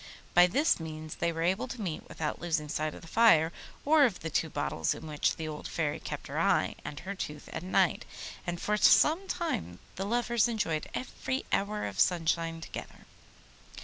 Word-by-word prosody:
By 175 0 +7
this 280 - +2
means 155 -1 -7
they 170 - +1
were 165 0 -3
able 190 +8 +1
to 250 -1 -7
meet 180 -7 -4
without 155 -2 -3
losing 160 -3 -1
sight 155 +1 -2
of - - -12
the - - -11
fire 165 -6 +5 0.3
or 305 0 +6
of 225 -9 +2
the 165 - -4
two 160 - +1
bottles 145 -1 -1
in - - -9
which 150 -1 0
the 160 - -5
old 150 -1 -6
Fairy 155 -3 -1
kept - - -6
her - - -3
eye - - +2
and 145 -1 -6
her 195 +2 -5
tooth 150 -6 -6
at 160 - -5
night, 185 +2 +2 0.4
and 175 0 -2
for 210 0 0
some 330 - +5
time 90 - -2 0.2
the 195 - -2
lovers 235 +1 +2
enjoyed 210 -10 -1
every 260 +1 -3
hour 210 +1 0
of - - -5
sunshine 165 -1 +1
together. - - -8
170 Hz, 190 wpm, -30 LUFS, 155-220 Hz, 0.4 s, By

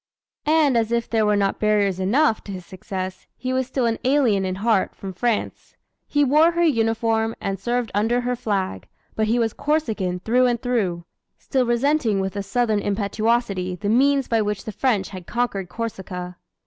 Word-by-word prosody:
And 305 -4 +4
as 225 0 -1
if 235 0 0
there 220 -2 +1
were 210 - +3
not 200 -1 0
barriers 205 -3 +2
enough 220 +6 +2
to 200 - -7
his 185 -2 -7
success, 185 0 -6
he 255 0 -3
was 260 -1 0
still 260 -1 -1
an 230 -1 0
alien 250 -8 +3
in 185 0 -2
heart, 205 0 +1
from 195 -1 -7
France. 230 +4 -2 0.3
He 290 0 +2
wore 305 +5 +4
her 345 0 +1
uniform 225 -5 +1
and 195 -1 -3
served 240 +1 -1
under 225 +5 +1
her 250 0 -1
flag, 200 -6 -2 0.3
but 220 0 +1
he 230 +3 +2
was 230 -2 +1
Corsican 220 - -1
through 245 +6 +3
and 240 -1 0
through 200 -9 -1 0.3
still 260 -3 0
resenting 240 -3 +2
with 190 +1 -2
a 200 - -1
Southern 215 +2 0
impetuosity 205 -2 0
the 200 +3 -3
means 275 +3 +3
by 225 -1 +2
which 210 -2 -2
the 220 - -4
French 210 -5 0
had 185 -3 -9
conquered 210 -7 -2
Corsica. 185 -5 -5
225 Hz, 185 wpm, -22 LUFS, 195-245 Hz, 0.3 s, And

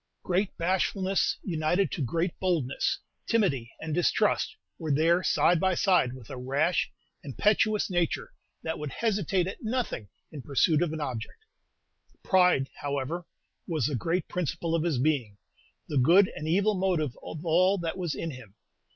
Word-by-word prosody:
Great 185 +2 0
bashfulness, 190 +2 +1
united 175 +2 0
to 170 - -3
great 165 +7 0
boldness, 165 -8 0 0.3
timidity, 170 - +1
and 160 -1 -4
distrust, 175 +5 +1 0.2
were 160 -3 -2
there 165 +5 +3
side 175 -1 +3
by 190 0 +2
side 175 -10 +3
with 130 -4 -11
a 135 - -6
rash, 140 +7 +1 0.3
impetuous 210 - +2
nature 175 -4 -1 0.3
that 160 - -3
would 150 -1 -4
hesitate 195 -5 0
at 190 - -6
nothing 225 - -2 0.2
in 150 - -7
pursuit 145 +4 +2
of 175 -3 +1
an 160 -1 -4
object. 130 - -5 0.8
Pride, 180 -8 +4
however, 145 +4 -3 0.4
was 155 -8 0
the 145 - 0
great 165 +8 -1
principle 170 -1 -2
of 165 - +2
his 160 -4 0
being, 125 -7 0 0.5
the 145 - +1
good 180 +9 +6
and 155 - -5
evil 200 +6 +3
motive 180 - 0
of 160 +2 -8
all 185 +4 +4
that 170 -2 -3
was 175 -5 -3
in 165 - -4
him. 120 -7 -12
165 Hz, 155 wpm, -28 LUFS, 145-185 Hz, 0.8 s, good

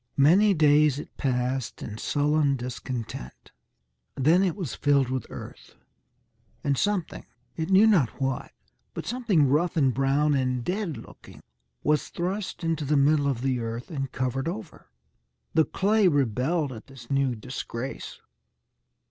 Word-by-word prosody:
Many 190 +9 +5
days 150 -2 +4
it 150 - -9
passed 125 -2 -2
in 110 0 -7
sullen 145 -1 +1
discontent. 125 - -6 0.6
Then 155 +7 +4
it 185 -4 +1
was 180 - -4
filled 140 -3 +2
with 130 0 -3
earth, - - -10 0.9
and 140 -1 +1
something 200 +2 -1 0.3
it 160 +1 -3
knew 195 +3 +6
not 180 - +4
what 135 -1 -2 0.4
but - - -5
something 215 - +2
rough 165 +6 +1
and 135 -4 +3
brown 140 +3 +2
and 130 -2 0
dead 180 - -2
looking, 115 - -13 0.4
was 150 0 +1
thrust 185 +2 -4
into 165 -2 -1
the 145 +1 +1
middle 145 +1 +3
of 130 -4 -1
the 130 -1 0
earth 115 +5 -5
and 135 -4 -3
covered 130 +2 -2
over. 185 0 -7 0.7
The 160 -1 +4
clay 205 +1 +2
rebelled 140 +1 +1
at 110 - -11
this 135 -3 -12
new 135 -2 +1
disgrace. 125 +2 -6
145 Hz, 140 wpm, -26 LUFS, 130-165 Hz, 0.9 s, knew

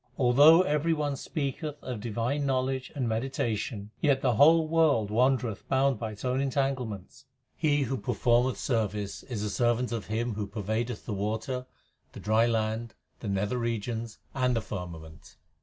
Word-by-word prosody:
Although 145 +7 +7
every 150 0 +1
one 150 -2 -1
speaketh 145 +2 -4
of 125 -4 -4
divine 120 +6 -2
knowledge 130 -1 -1
and 130 -4 -1
meditation, 110 -3 -2
Yet 140 -3 +2
the 125 -3 +3
whole 160 +7 +6
world 155 -10 +2
wandereth 120 -2 +1
bound 135 -3 +2
by 110 -2 -4
its 105 - -9
own 130 +1 +1
entangle 135 -2 0
ments. 110 +6 -10 0.3
He 145 -3 +2
who 135 +1 -2
performeth 120 +3 +1
service 105 -5 -2
is 115 -6 -5
a 105 - -1
servant 120 +2 +1
of 115 -5 -4
Him 115 +2 -1
Who 105 -1 -3
pervadeth 110 +2 -3
the 110 - -3
water, 110 +6 -3 0.5
the - - -9
dry 110 +3 +3
land, 110 0 -1 0.2
the 110 - -6
nether 100 +5 -1
regions, 115 -1 -3 0.2
and 125 -2 +1
the 115 - 0
firmament. 85 -6 -8
120 Hz, 160 wpm, -28 LUFS, 110-135 Hz, 0.5 s, Although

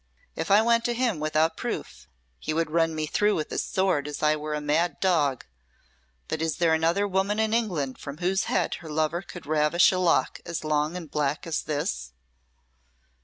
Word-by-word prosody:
If - - -3
I 205 +2 +6
went 230 0 +3
to 240 - 0
him 235 -8 0
without 155 +1 +1
proof, - - -5 0.3
he 115 - -3
would 165 -1 0
run 165 -1 +2
me 155 0 -1
through 205 +7 +2
with 155 - -3
his - - 0
sword 185 -7 0
as 150 +1 -6
I 150 0 +4
were 150 0 -4
a - - -2
mad 150 +2 0
dog. 150 -9 +1 0.8
But 160 - -3
is 160 -2 -1
there 165 -2 +3
another 165 +6 +2
woman 195 +2 0
in 220 0 +1
England 175 - -1
from 140 +1 -7
whose 185 +3 0
head - - 0
her 160 - -9
lover 155 +3 0
could 175 -4 -10
ravish 155 +3 +4
a 185 - -1
lock 175 -2 +2
as 170 -2 -5
long 155 +2 0
and 165 -5 -9
black 150 -1 -1
as 165 -2 -1
this?" 145 - -3
160 Hz, 195 wpm, -26 LUFS, 150-185 Hz, 0.8 s, I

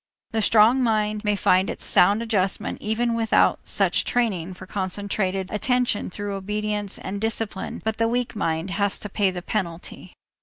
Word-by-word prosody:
The 220 - 0
strong 225 +5 +5
mind 215 -2 0
may 210 -1 +2
find 190 -1 +3
its - - -5
sound 205 +5 +4
adjustment 195 -4 -1
even 230 +2 0
without 225 -1 +3
such - - +1
training 190 -7 -1
for 185 - -10
concentrated 195 0 -2
attention 245 0 0
through 205 +2 -5
obedience 210 +1 -3
and 200 +2 -5
discipline 220 -3 -3
but 220 0 -1
the 230 - +3
weak 245 0 -1
mind 165 -2 -1
has 200 0 0
to 210 - -5
pay 195 0 +1
the 180 -1 -6
penalty. 180 -5 -4
210 Hz, 160 wpm, -24 LUFS, 190-220 Hz, -, strong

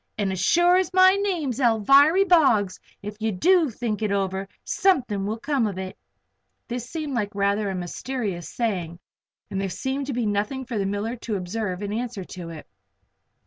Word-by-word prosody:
And 200 -2 0
as 190 - -3
sure 350 - +4
as 370 -2 0
my 370 0 +8
name's 350 - -1
Alviry 275 - +5
Boggs, 240 - +3 0.2
if 210 +1 -6
you 220 0 0
do 335 - +3
think 220 -2 -3
it 215 -2 0
over, 195 -1 -1 0.2
something 245 - +1
will 220 +2 -2
come 270 -2 0
of 195 -3 -5
it!" 190 0 -5 0.7
This 245 0 -5
seemed 310 -4 -4
like 210 -4 -2
a - - -8
rather 200 0 +1
mysterious 185 0 -4
saying, 180 -8 -2 0.5
and 195 - -2
there 195 - -2
seemed 265 +7 -3
to 280 - -2
be 240 -1 -1
nothing 210 +6 -1
for 235 -3 -3
the 195 - 0
miller 205 +4 -2
to 220 -2 -4
observe 190 0 -3
in 205 0 -3
answer 230 -3 -4
to 175 -1 -8
it. 160 -2 -9
220 Hz, 185 wpm, -24 LUFS, 195-270 Hz, 0.7 s, my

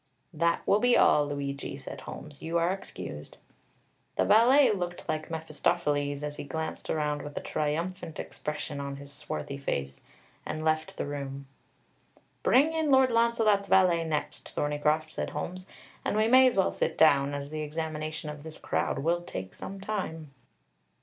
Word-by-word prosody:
"That 170 +1 +1
will 205 - +4
be 245 +2 +4
all, 150 -1 +5
Luigi," 140 -1 -4
said 140 - -8
Holmes; 145 -2 -9
"you 165 +1 -1
are 170 +1 +2
excused." 195 - -8 0.8
The - - +2
valet 250 +6 +6
looked 175 -3 -3
like 155 0 -2
Mephistopheles, 150 -3 -1
as 150 0 -4
he - - -5
glanced 160 +3 -5
around 150 -1 0
with 145 0 -8
a - - +1
triumphant 160 +2 -3
expression 150 -1 -4
on 140 0 -4
his 140 0 -9
swarthy 140 0 -5
face, 70 - -3 0.4
and 155 0 -4
left 155 0 0
the - - -2
room. 140 -1 -5 1.0
"Bring 295 +5 +4
in 320 -2 0
Lord 265 -2 +5
Launcelot's 230 -3 +3
valet 180 -4 +4
next, 155 -2 -3
Thorneycroft," 150 +2 +1
said - - -3
Holmes. 185 +1 -5 0.4
"And - - 0
we 215 +1 +4
may 260 +2 +7
as 245 - +1
well 190 - +3
sit - - -1
down, 145 -2 +5
as 140 0 -5
the 155 0 -3
examination 155 0 -4
of 150 -1 -9
this 155 +1 -9
crowd - - -1
will 170 +5 +1
take 95 - -6
some 195 0 -7
time." 185 -7 -4
155 Hz, 165 wpm, -29 LUFS, 145-185 Hz, 1.0 s, may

